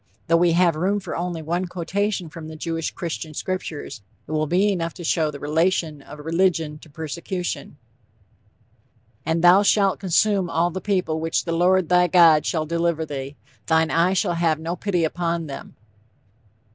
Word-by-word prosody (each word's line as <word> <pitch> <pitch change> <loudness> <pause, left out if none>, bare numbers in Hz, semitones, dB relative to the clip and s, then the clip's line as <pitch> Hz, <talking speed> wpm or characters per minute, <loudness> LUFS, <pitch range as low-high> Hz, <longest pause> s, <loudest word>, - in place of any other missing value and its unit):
Though 165 - +3
we 170 0 +3
have 170 -1 +3
room 190 +6 0
for 195 - -6
only 170 -2 -3
one 175 +4 -2
quotation 190 +2 -2
from 160 0 -9
the 160 - -8
Jewish 165 0 -3
Christian 160 -2 -6
Scriptures, 165 - -5 0.3
it - - -8
will 155 0 0
be 190 +6 +2
enough 170 -4 -3
to 175 - -8
show 160 -1 +1
the 145 -1 -8
relation 160 0 0
of 150 - -11
religion 160 -1 0
to 155 - -16
persecution: 160 0 -5 1.5
"And 165 +1 0
thou 180 +3 +7
shalt 200 -2 +3
consume 195 0 +2
all 170 +1 +1
the 190 +2 -5
people 180 -6 0
which 165 +1 -1
the 170 - -2
Lord, 180 +1 +3
thy 180 +1 +4
God, 165 -3 +5
shall 160 -2 0
deliver 170 0 0
thee; 140 -1 -6 0.3
thine 160 0 +2
eye 170 +3 +3
shall 180 -2 +1
have 165 -2 +1
no 165 +2 -3
pity 180 -2 -1
upon 170 +1 -1
them." 140 -2 -9
170 Hz, 170 wpm, -23 LUFS, 160-180 Hz, 1.5 s, thou